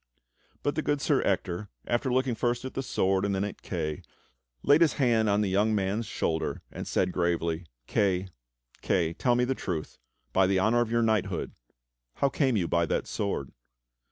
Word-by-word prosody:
But 145 - +1
the 155 - -1
good 145 -1 0
Sir - - +2
Ector, 90 +4 -1 0.2
after 120 +2 0
looking 130 0 +2
first 120 +2 -1
at 130 - -5
the 135 - -2
sword 95 -6 +1
and 100 -1 0
then 95 - 0
at 105 - -5
Kay, 75 -5 -3 0.6
laid 145 +3 +5
his 165 - +5
hand 115 -5 +2
on 100 +1 +3
the 105 - +1
young 105 +3 +2
man's 100 +3 -1
shoulder 80 -4 -2
and - - -6
said 90 -1 +1
gravely: 85 -1 -1 0.2
"Kay, 95 - +1 0.5
Kay, 85 -3 +1
tell 120 +7 +2
me 125 0 +2
the 135 - 0
truth, 85 -10 -5 0.3
by 95 -1 +4
the 95 0 +2
honor 110 +5 +3
of 120 - 0
your 115 0 +2
knighthood, 110 -3 0 0.6
how 140 - +2
came 130 -5 +1
you 90 -4 0
by 85 0 +1
that - - 0
sword. 100 -10 -3
105 Hz, 185 wpm, -28 LUFS, 90-120 Hz, 0.6 s, laid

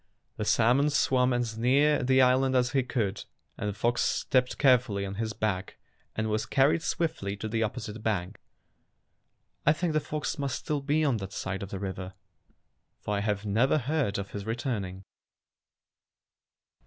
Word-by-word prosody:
'' - - -46
The 105 - -2
salmon 125 +7 +3
swam 130 -3 +2
as 120 -2 -1
near 140 +5 +3
the 130 +1 +4
island 130 +1 +3
as 125 -1 +2
he 135 - +2
could, 115 -6 -2 0.3
and 105 - -3
the - - -3
fox 120 +4 0
stepped 125 -1 +1
carefully 125 -7 +3
on 95 - -5
his 110 -1 -2
back 100 -4 -2 0.4
and 110 0 -1
was 110 0 -1
carried 140 +4 +3
swiftly 155 -14 -2
to 110 - -4
the 115 +1 -1
opposite 110 -1 -3
bank. 100 -5 -2 1.2
I 150 - +5
think 165 +1 -1
the 155 - +3
fox 150 0 -4
must 140 -1 -1
still 150 -2 -2
be 150 +3 +1
on 135 -5 +2
that 95 -2 -7
side 95 0 -4
of 100 - -6
the 100 - -5
river, 95 -1 -5 0.8
for 105 - -3
I - - 0
have 105 0 -1
never 115 +8 +2
heard 140 -6 0
of 100 0 -5
his 100 - -5
returning. 110 -5 -3
120 Hz, 170 wpm, -28 LUFS, 100-135 Hz, 1.2 s, I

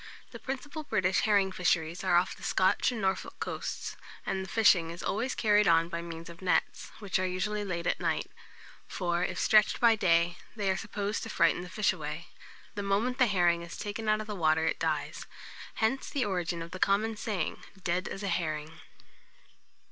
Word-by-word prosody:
The - - -9
principal 285 +4 -5
British 190 -10 +1
herring 200 -3 +3
fisheries 175 -1 0
are 185 -2 +3
off 175 +2 +2
the - - -17
Scotch 190 +6 +2
and 240 - -4
Norfolk 190 -1 -1
coasts; - - -4 0.3
and 190 0 -1
the 190 - -9
fishing 195 -7 +4
is 170 +1 -7
always 235 +6 -1
carried 210 -1 +4
on 165 0 +4
by 170 -1 -3
means 165 -1 -8
of 170 +1 -11
nets, 185 -1 0
which 200 -3 -1
are 185 - +1
usually 205 +3 -2
laid 175 -4 -3
at - - 0
night; - - 0 0.6
for, 175 -1 -1
if 185 0 -2
stretched 215 -2 +4
by 230 -2 +6
day, 175 -4 +2 0.2
they 200 -3 0
are - - 0
supposed 210 0 -3
to 225 - -6
frighten 170 -4 +2
the 180 - -8
fish 210 -1 +1
away. 155 -1 -6 0.4
The 205 - -3
moment 210 +6 0
the 250 - +6
herring 175 -4 +3
is 170 0 -8
taken 215 +1 -3
out 215 0 +3
of - - -6
the 210 - -5
water 160 -3 +2
it 165 - 0
dies. - - -2 0.5
Hence 240 +5 0
the 280 -4 0
origin 175 -3 -2
of 170 - -10
the 185 - -7
common 210 +4 +2
saying, 205 -5 -3 0.2
"dead 175 +2 0
as 195 - -6
a - - -1
herring." 160 -3 -2
190 Hz, 195 wpm, -30 LUFS, 170-210 Hz, 0.6 s, by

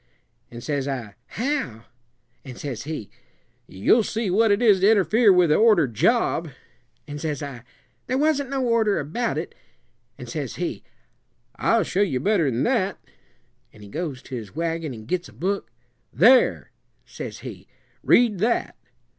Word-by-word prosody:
An' 120 0 -9
says 140 0 -2
I, 125 -7 -4
'How?' 240 - -3 0.6
An' 130 -3 -9
says 125 -3 -6
he, 150 -9 -6 0.6
'You'll 100 - +3
see 220 -2 -2
what 220 +4 +3
it 200 0 +3
is 215 -6 +5
to 195 +3 +4
interfere 215 +1 +4
with 180 -4 +4
a - - +5
ordered 195 - +4
job.' - - +1 0.6
An' 145 0 -6
says 150 -1 -3
I, 135 -4 -7 0.5
'There 255 - 0
wasn't 285 -2 +1
no 270 -1 -1
order 230 -3 +2
about 170 - -2
it;' - - -4 0.6
an' - - -8
says - - -5
he, - - -4 0.7
'I'll 230 -2 +2
show 185 +4 -1
you 170 -11 +1
better 175 -2 +2
than 120 0 -1
that;' 215 -6 0 0.7
an' 105 - -16
he 100 - -12
goes 150 - -5
to 130 - -7
his 110 -2 -8
wagon 165 -2 -2
an' 110 -3 -9
gits 180 +7 -3
a - - -17
book, 180 - -3 0.4
'There,' 255 +2 +4 0.3
says - - -8
he, - - -9 0.3
'read 230 -6 +3
that.' 230 +5 0
180 Hz, 160 wpm, -23 LUFS, 135-225 Hz, 0.7 s, is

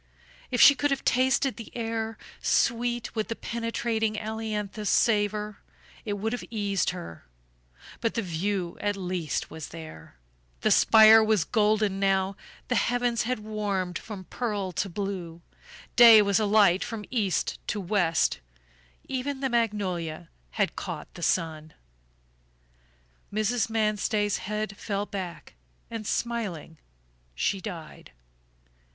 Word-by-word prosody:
If 245 - -1
she 285 - +10
could 290 +1 0
have 275 -1 -2
tasted 260 +1 +2
the 230 - -9
air, 225 -1 -3 0.2
sweet 240 0 +1
with 220 -2 -2
the 230 - -3
penetrating 230 -2 -2
ailanthus 215 -1 -3
savor, 210 -2 +1 0.5
it 210 - -2
would 215 +3 -2
have 245 - -4
eased 205 -5 0
her; 85 - -8 0.7
but 230 - -1
the 230 - 0
view 180 +1 -2
at 205 -1 -1
least 180 -4 -3
was 160 -1 -7
there 155 - -11 0.5
the - - +2
spire 220 0 +8
was 215 -5 +2
golden 210 -3 +1
now, 195 0 +1 0.3
the - - 0
heavens 240 -1 +1
had 255 - 0
warmed 205 -4 -2
from 205 -4 -8
pearl 205 -3 -3
to 190 +3 -2
blue, 175 -3 -5 0.5
day 230 -2 +10
was 200 0 +2
alight 205 -3 +4
from 220 -3 -6
east 210 -7 0
to 210 - -1
west, 175 - +1 0.7
even 270 +1 -3
the 270 -1 -1
magnolia 185 -8 -1 0.3
had - - +1
caught - - -6
the - - -10
sun. 160 -3 -1 1.6
Mrs. 215 +3 0
Manstey's 215 -1 0
head 210 0 -4
fell 205 -1 -2
back 190 -4 -7 0.4
and 225 -2 -5
smiling 200 -10 -3 0.6
she 190 - 0
died. 170 -7 -8
210 Hz, 125 wpm, -27 LUFS, 190-225 Hz, 1.6 s, she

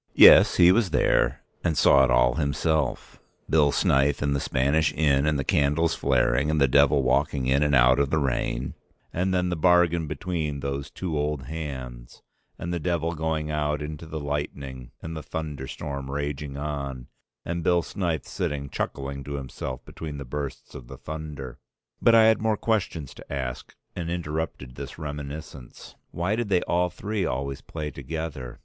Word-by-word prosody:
Yes, - - +9
he 90 0 +7
was 110 -1 +3
there - - +2 0.2
and 80 -3 0
saw 70 +1 +6
it 65 - +3
all - - +4
himself, 75 -1 -1 0.3
Bill 75 -3 +4
Snyth 70 +1 +2
in 70 0 +1
the 70 - 0
Spanish 70 +5 +1
inn 75 -2 +3
and 75 -2 +2
the 70 - -1
candles 75 +5 +2
flaring, 65 +1 +2
and 75 0 +1
the 70 - +5
Devil 70 +1 +4
walking 65 +1 +1
in 65 +2 +2
and 75 -1 +3
out 65 +1 +5
of 70 -1 +2
the 80 - +1
rain, 65 -2 -1 0.4
and 95 +2 0
then 90 -1 +1
the 90 - -1
bargain 85 -1 +3
between 75 -2 -3
those 70 0 -3
two 90 -4 -4
old 75 -2 -1
hands, 65 -5 -7 0.3
and 85 +1 -4
the 85 - -1
Devil 85 +1 -1
going 80 -1 -2
out 75 -1 0
into 75 +1 -6
the 80 0 -5
lightning, 70 -3 -4
and 80 0 -5
the 80 - -5
thunderstorm 70 -3 -5
raging 70 0 -4
on, 70 -3 -4 0.4
and 85 0 -3
Bill 85 0 +3
Snyth 85 -6 -2
sitting 70 -2 -3
chuckling 70 +1 -4
to 70 - -5
himself 65 -1 -6
between 75 -3 -7
the 70 - -6
bursts 70 +1 -6
of 65 -5 -10
the - - -10
thunder. 75 -5 -7 0.4
But 115 - +6
I 115 - +7
had 110 0 +4
more 110 -1 +1
questions 90 - -1
to - - -14
ask 65 -3 -5 0.2
and 85 -1 -4
interrupted 80 -6 -4
this - - -8
reminiscence. 75 -3 -8 0.2
Why 90 +5 -1
did 115 -2 -2
they 90 -3 +2
all 90 +1 +1
three 105 +3 -3
always 70 -1 -3
play 75 -2 -5
together? 70 -3 -6
75 Hz, 175 wpm, -26 LUFS, 70-80 Hz, 0.4 s, Yes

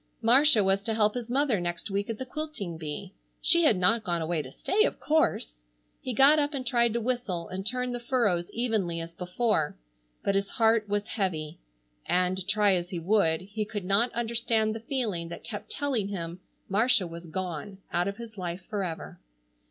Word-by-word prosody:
Marcia 245 -1 +6
was 195 +1 +2
to 220 +2 -2
help 210 -1 +3
his 245 -2 -5
mother 260 -4 +2
next 175 +3 -4
week 200 +3 -1
at 225 - -3
the 260 - -5
quilting 255 - -5
bee. 160 +4 -6 0.3
She 340 -1 +4
had 220 - +5
not 220 +5 +3
gone 175 -3 0
away 160 0 -1
to 130 - -10
stay, 420 - +1
of - - -1
course. - - 0 0.4
He 255 - -3
got 275 +5 +6
up 290 0 0
and 260 -2 -4
tried 235 -1 +2
to 235 - 0
whistle 225 -8 -2
and 190 +1 -4
turn 250 +1 0
the 245 - -3
furrows 230 -8 +1
evenly 215 -8 -1
as 165 0 -7
before, 180 -3 0 0.5
but 200 - +1
his 195 0 0
heart 225 -2 +2
was 205 0 0
heavy, 170 -9 -3 0.5
and, 180 +1 +1
try 205 -1 +3
as 175 -1 -1
he 180 - -4
would, 165 -2 +2
he 205 +3 -4
could 205 -2 -5
not 200 +6 +3
understand 230 -2 0
the 225 - -5
feeling 225 - -2
that 170 - -8
kept 210 -3 -7
telling 270 -8 -1
him 175 -3 -5 0.3
Marcia 215 0 +3
was 170 0 -8
gone 185 +2 -5 0.2
out 175 +2 +1
of 200 - -3
his 225 -3 -9
life 180 0 -4
forever. 190 -6 -4
205 Hz, 190 wpm, -28 LUFS, 180-235 Hz, 0.5 s, Marcia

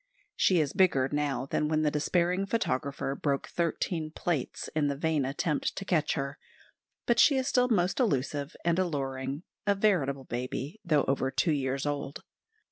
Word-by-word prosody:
She 185 -3 +3
is 145 -3 0
bigger 135 -9 +3
now 145 -3 -1
than 150 +2 0
when 155 0 +1
the 150 - +2
despairing 175 +5 +1
photographer 140 - -1
broke 140 0 -1
thirteen 165 -1 -1
plates 155 -3 -2
in 150 -2 +2
the 140 - -1
vain 155 -2 +1
attempt 145 +3 -1
to 195 - -5
catch 160 -5 +1
her; 140 0 -4 0.7
but 240 0 +2
she 280 - +6
is 260 0 0
still 250 -2 +3
most 185 -2 +1
elusive 145 - 0
and 170 +1 +2
alluring, 135 -3 -2 0.2
a 200 - +4
veritable 155 -10 +1
baby, 130 - -4
though 150 -4 +3
over 135 -1 0
two 160 - +1
years 135 -1 -1
old. 145 -1 -3
150 Hz, 165 wpm, -29 LUFS, 140-175 Hz, 0.7 s, she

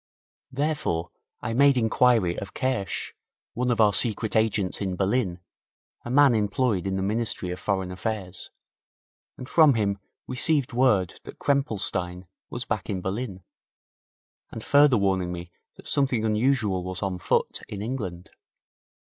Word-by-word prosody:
Therefore 135 - -1 0.3
I 110 - -3
made 140 +2 +5
inquiry 115 -5 +3
of 100 - -9
Kersch, 130 -8 -2 0.4
one 125 +1 -1
of 120 - 0
our 105 -2 +5
secret 110 0 +1
agents 110 -4 +1
in 95 -2 -2
Berlin, 95 -2 0 0.6
a - - -7
man 140 0 +5
employed 105 -2 0
in 95 - -1
the 95 - -1
Ministry 105 -3 -1
of 90 - -5
Foreign 95 -2 -1
Affairs, 95 -1 -4 0.9
and 125 - -8
from 155 -4 +5
him 100 -3 0 0.3
received 130 +1 0
word 110 -8 +2
that - - -10
Krempelstein 95 -10 0 0.2
was 120 +1 -5
back 105 -3 -3
in 95 -3 -1
Berlin, 95 -1 -4 1.1
and 110 - -7
further 145 -3 +5
warning 95 -3 0
me 85 0 -7 0.2
that - - -13
something 130 -5 +1
unusual 110 -4 +1
was 95 +2 -4
on 95 -2 -2
foot - - 0
in 100 -1 -5
England. 100 -8 -5
105 Hz, 140 wpm, -26 LUFS, 95-125 Hz, 1.1 s, made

